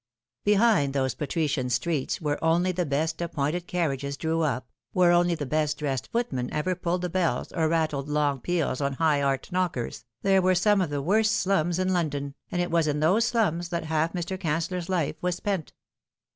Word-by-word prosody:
Behind 205 -9 +3
those 130 -3 +1
patrician 145 -4 -1
streets 130 +4 -1
where 150 -2 -2
only 170 +3 +3
the 180 -2 -2
best 160 +4 -1
appointed 170 +1 -2
carriages 140 -5 -2
drew 160 +2 0
up, 135 -5 -1 0.3
where 180 -2 +5
only 175 0 +3
the 145 - -4
best 150 +1 0
dressed 135 -5 -3
footmen 135 - -1
ever 155 +5 0
pulled 175 0 -2
the - - +1
bells 170 -8 0
or 160 -2 +1
rattled 155 -3 0
long 145 -2 +1
peals 160 -3 -1
on 140 0 0
high 150 0 +2
art 135 -1 -1
knockers, 175 -10 -2 0.2
there 195 -1 +4
were 185 0 +3
some 200 +2 +3
of 175 - 0
the 145 -1 -2
worst 215 +6 +3
slums 175 -5 +1
in 185 0 +1
London, 145 -5 -1 0.2
and 175 0 0
it 175 - -4
was 165 -2 +2
in 150 0 0
those 185 +9 +3
slums 175 -8 0
that 170 -2 -2
half 160 +1 0
Mr. 180 +1 -3
Cancellor's 170 +2 -2
life 170 -5 0
was 180 -1 0
spent. 190 -4 -3
165 Hz, 190 wpm, -26 LUFS, 145-180 Hz, 0.3 s, where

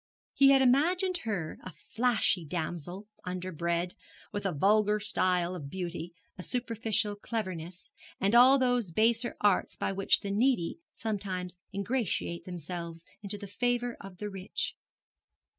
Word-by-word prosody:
He 275 -1 +6
had 270 -1 +6
imagined 350 +9 +3
her 180 -7 -3
a 185 - -8 0.2
flashy 225 -6 +2
damsel, 175 +4 -4 0.2
underbred, 175 -1 -2 0.4
with 205 -1 -2
a - - 0
vulgar 210 +6 +3
style 180 -3 +1
of 150 -6 -6
beauty, 175 -1 -4 0.3
a - - -3
superficial 225 -2 0
cleverness, 185 -5 -5 0.3
and 200 +3 +2
all 255 +3 +8
those 245 -6 +2
baser 230 +5 +2
arts 205 -3 +3
by - - -1
which 195 0 +3
the 200 - -3
needy 230 - +1
sometimes 185 -4 -4
ingratiate 200 -5 -2
themselves 170 -1 -6 0.2
into 205 0 -2
the 200 - -8
favour 245 +4 -1
of 195 -2 -10
the 210 +2 -5
rich. 195 0 -3
200 Hz, 135 wpm, -30 LUFS, 180-230 Hz, 0.4 s, all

